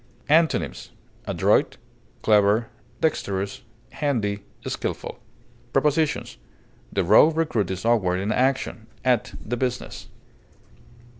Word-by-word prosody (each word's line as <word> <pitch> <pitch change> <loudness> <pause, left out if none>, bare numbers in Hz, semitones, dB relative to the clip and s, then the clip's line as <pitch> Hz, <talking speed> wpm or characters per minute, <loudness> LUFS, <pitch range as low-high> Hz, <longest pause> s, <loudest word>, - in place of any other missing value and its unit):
Antonyms: 160 +2 +2 0.4
adroit, - - +2 0.5
clever, 105 +1 +4 0.3
dexterous, 100 -10 -1 0.3
handy, 110 -9 -1 0.3
skilful. - - -4 0.5
Prepositions: 150 +1 +1 0.5
The 95 - +1
raw 110 - +6
recruit 155 - 0
is 95 +2 -4
awkward 95 -6 +2
in 100 +3 -1
action; 125 -3 0 0.2
at 125 -1 +1
the 120 +3 -2
business. 125 0 -3
115 Hz, 90 wpm, -24 LUFS, 100-140 Hz, 0.5 s, raw